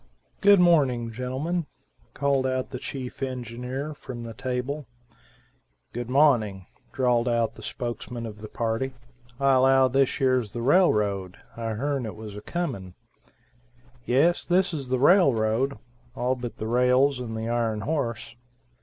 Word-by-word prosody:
"Good 200 -1 +7
morning; 135 -10 +3
gentlemen," 135 +8 -3 0.5
called 140 -2 +1
out 130 0 -2
the 125 - -5
chief 130 -1 -7
engineer, 130 +3 -4
from 125 -4 -8
the 115 -1 -7
table. 130 +4 -3 1.1
"Good 120 0 -5
mawning," 120 -9 +3 0.3
drawled 125 -2 +1
out 115 -1 +1
the - - -13
spokesman 120 -1 -5
of 105 -1 -8
the 110 - -8
party. 115 +3 -2 0.5
"I 135 0 +4
allow 130 0 +5
thish 135 +2 +1
yers 130 -6 +1
the 120 - -4
railroad, 105 - +2 0.2
I 115 -1 -3
heern 135 0 -2
it 105 - -7
was 110 -2 -9
a 105 - -7
comin'." 105 - -4 1.1
"Yes, 145 +9 +3
this 180 +1 +2
is 140 -5 -4
the 130 - +1
railroad; 135 - +3 0.4
all 125 0 0
but 120 -2 -6
the 110 - -4
rails 125 +3 +3
and 115 -3 -5
the 110 - -3
ironhorse." 115 +2 -2
125 Hz, 140 wpm, -26 LUFS, 115-140 Hz, 1.1 s, Good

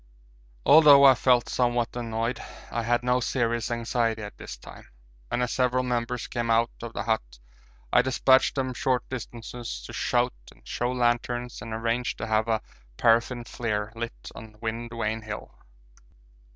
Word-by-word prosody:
Although 145 -2 +8
I 135 -1 +9
felt 125 0 +3
somewhat 120 -2 0
annoyed, 115 0 -2 0.3
I 115 - -1
had 120 +1 +1
no 125 0 +2
serious 120 -2 -1
anxiety 115 -1 -1
at 105 - -8
this - - -9
time, - - -13 0.4
and 125 - 0
as 125 - -1
several 125 0 +1
members 125 -1 -2
came 120 -1 -3
out 115 +1 +3
of 115 -1 -7
the 100 - -3
hut 105 - -2 0.6
I 125 - +7
despatched 130 +1 +3
them 130 -2 -1
short 125 0 0
distances 120 - -6
to - - -9
shout - - +1 0.2
and - - -21
show 120 +1 -1
lanterns 120 -1 -1
and 115 +1 -7
arranged 115 +2 -1
to 115 - -4
have 110 0 +1
a 110 -1 0 0.3
paraffin 120 +1 +2
flare 110 -3 -3
lit 115 0 -6
on 110 -1 -11
Wind 115 +1 -4
Vane 110 -1 -2
Hill. 105 -1 -7
120 Hz, 160 wpm, -26 LUFS, 115-125 Hz, 0.6 s, I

